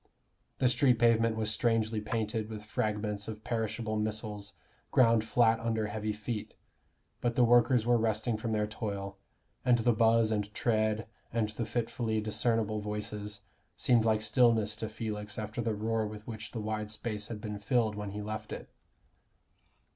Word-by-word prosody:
The 130 - +3
street 125 0 +4
pavement 115 -1 +4
was 110 -1 0
strangely 110 -1 +1
painted 110 0 -2
with 105 -1 -7
fragments 105 -1 -1
of 110 -1 -6
perishable 110 -1 -2
missiles 105 -2 -3 0.4
ground 115 -3 +5
flat 115 0 +3
under 115 -1 0
heavy 105 +1 -2
feet: 105 +1 -5 0.7
but 120 -1 0
the 125 - +5
workers 120 0 +5
were 120 -1 +4
resting 110 +1 +1
from 110 +1 -3
their 105 -1 +1
toil, 100 -2 -5 0.4
and 125 -1 +5
the 120 +1 +3
buzz 115 0 +4
and 105 -1 -1
tread 110 -1 +1 0.3
and 115 -2 0
the 110 +2 -4
fitfully 115 -2 -1
discernible 110 0 +1
voices 105 0 -3 0.4
seemed 120 -3 +4
like 110 -1 +2
stillness 110 -1 +3
to 110 0 -3
Felix 105 -1 -4
after 110 +2 -3
the 115 -2 -1
roar 110 +1 0
with 105 0 -9
which 110 -2 -6
the 115 - -4
wide 105 0 -3
space 110 -1 -3
had 110 -3 -6
been 105 -2 -5
filled 110 +1 +1
when 105 -1 -5
he 105 +1 -5
left 110 +1 -5
it. - - -7
110 Hz, 160 wpm, -31 LUFS, 105-115 Hz, 0.7 s, ground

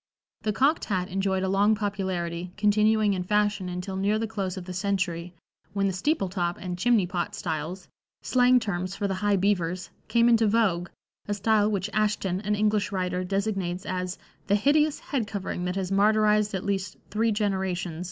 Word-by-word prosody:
The 215 - 0
"cocked" 275 +9 +2
hat 185 -2 -1
enjoyed 190 0 0
a - - 0
long 200 +3 +3
popularity, 185 -4 -3
continuing 210 0 +3
in 185 - -2
fashion 205 -1 +1
until 180 +2 -4
near 200 +3 +1
the 225 - -1
close 200 -4 -3
of 180 - -6
the 185 - -6
century, 180 -3 -2 0.4
when 200 -1 +1
the 195 - +1
"steeple 200 - 0
top" 175 -2 -2
and 180 -1 -5
"chimney 220 +1 +3
pot" 175 -1 -3
styles 165 +3 -4 0.4
slang 250 0 +4
terms 185 -4 -3
for 200 0 -1
the 195 - -1
high 205 -1 +3
beavers 180 -2 0 0.2
came 235 0 +3
into 230 -2 +4
vogue, 200 -6 +1 0.4
a 205 - -1
style 210 +1 +2
which 200 -2 -1
Ashton, 205 -3 0
an 210 0 0
English 210 0 +1
writer, 180 -1 -1
designates 195 -2 -2
as 185 0 -3 0.3
"the 200 - +3
hideous 290 +7 +3
head 250 -7 -3
covering 195 -3 -4
that 180 +1 -2
has 190 -1 -2
martyrized 210 +1 +3
at 190 - -4
least 195 -1 -2
three 225 +2 +1
generations." 190 -5 -1
195 Hz, 180 wpm, -26 LUFS, 180-210 Hz, 0.4 s, slang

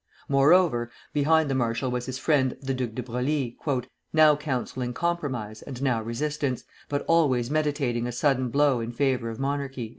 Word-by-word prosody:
Moreover, 140 -3 +4 0.2
behind 155 +2 +3
the 135 - -1
marshal 120 0 0
was 125 0 -3
his 130 0 -3
friend 130 -5 +1
the 135 -1 -2
Duc 125 -4 -3
de 125 - -3
Broglie, 125 +1 -2 0.6
"now 155 -1 +6
counselling 130 -4 -3
compromise 135 -11 -2
and 130 -3 -8
now 130 -4 +1
resistance, 130 +3 -2 0.3
but 145 0 -2
always 140 -7 +3
meditating 145 -6 0
a - - -3
sudden 130 0 +1
blow 140 -1 +3
in 115 +1 -4
favor 125 -2 0
of 115 - -6
monarchy." 135 -4 -3
130 Hz, 160 wpm, -26 LUFS, 120-145 Hz, 0.6 s, now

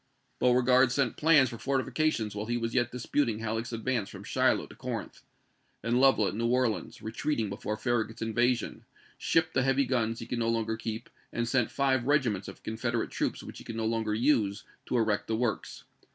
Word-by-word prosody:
Beauregard 125 +1 +4
sent 135 -3 +1
plans 150 -4 +5
for 115 - -8
fortifications 135 -4 0
while 105 +1 -4
he 120 0 0
was 115 -1 -2
yet 120 -1 +1
disputing 125 -1 0
Halleck's 115 +1 -3
advance 115 -2 -1
from - - -10
Shiloh - - +2
to - - -14
Corinth; - - -5 0.6
and 120 +2 +2
Lovell 135 -6 +5
at - - -2
New 115 +3 -1
Orleans, 125 -2 0
retreating 110 0 -1
before 105 +1 -3
Farragut's 115 -1 -1
invasion, 120 +2 0 0.4
shipped 165 0 +1
the 130 - +3
heavy 135 +1 +2
guns 115 -3 0
he - - -6
could 120 - -3
no 115 0 +1
longer 115 -1 0
keep, 110 0 -5 0.2
and 120 0 -1
sent 125 -1 +2
five 130 -2 +1
regiments 120 -10 +1
of - - -10
Confederate 115 +1 -2
troops - - -2
which - - -9
he - - -10
could 115 - -7
no 115 0 -2
longer 110 -1 0
use, 110 -5 +2 0.2
to 125 - 0
erect 110 -3 +1
the 110 - 0
works. 115 -2 -2
120 Hz, 190 wpm, -29 LUFS, 110-130 Hz, 0.6 s, plans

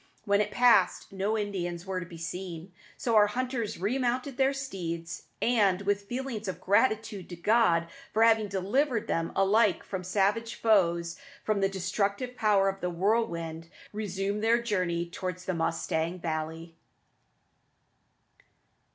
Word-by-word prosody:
When 200 -1 +3
it 210 - -1
passed, 245 +2 +3
no 200 +3 -1
Indians 180 -4 -3
were 190 -1 -2
to 175 - -7
be 170 - -10
seen. 175 +1 -6 0.3
So 230 -2 0
our 210 -1 +7
hunters 245 0 -2
remounted 250 +6 -1
their 265 +1 +3
steeds, 180 -12 -5
and, 200 -5 +2
with 200 0 0
feelings 245 -4 -4
of 180 -2 -4
gratitude 215 0 +1
to 175 - -6
God 175 -3 +3 0.2
for 220 - +3
having 225 -2 +4
delivered 220 +6 0
them 165 -6 -1
alike 200 0 +3
from 190 -2 -5
savage 205 +5 0
foes 170 -6 +2
and 280 0 -20
from 215 -2 +1
the 195 - +3
destructive 200 +6 -2
power 205 -4 +3
of 195 0 -2
the 180 - -1
whirlwind, 170 -4 -1 0.2
resumed 200 0 -2
their 230 +1 +4
journey 180 -7 -1
towards 180 +1 -5
the 185 - -1
Mustang 165 +1 -1
Valley. 160 0 -4
200 Hz, 145 wpm, -29 LUFS, 175-225 Hz, 0.3 s, our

